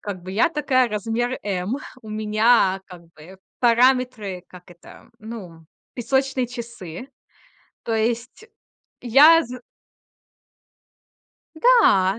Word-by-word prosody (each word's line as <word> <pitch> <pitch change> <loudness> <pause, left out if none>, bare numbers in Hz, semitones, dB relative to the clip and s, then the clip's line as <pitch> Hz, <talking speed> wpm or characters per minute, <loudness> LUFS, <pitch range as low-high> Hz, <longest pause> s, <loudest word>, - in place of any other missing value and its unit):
как 195 -4 -7
бы 185 - -8
я 220 - +2
такая, 265 -6 +1
размер 225 +4 -3
"M". 195 +4 -3 0.3
У 220 - -12
меня 215 -2 +2
как 180 -2 -13
бы 180 +5 -15 0.2
параметры, 240 -6 +1
как 180 -1 -15
это, 175 -1 -17
ну, 190 -8 -10 0.3
песочные 265 +1 -1
часы. 235 -4 -9 0.8
То 225 - -2
есть 235 - -3 0.5
я 295 +7 +6
з 250 +1 -9 2.0
Да, 225 - +4
230 Hz, 105 wpm, -22 LUFS, 190-255 Hz, 2.0 s, я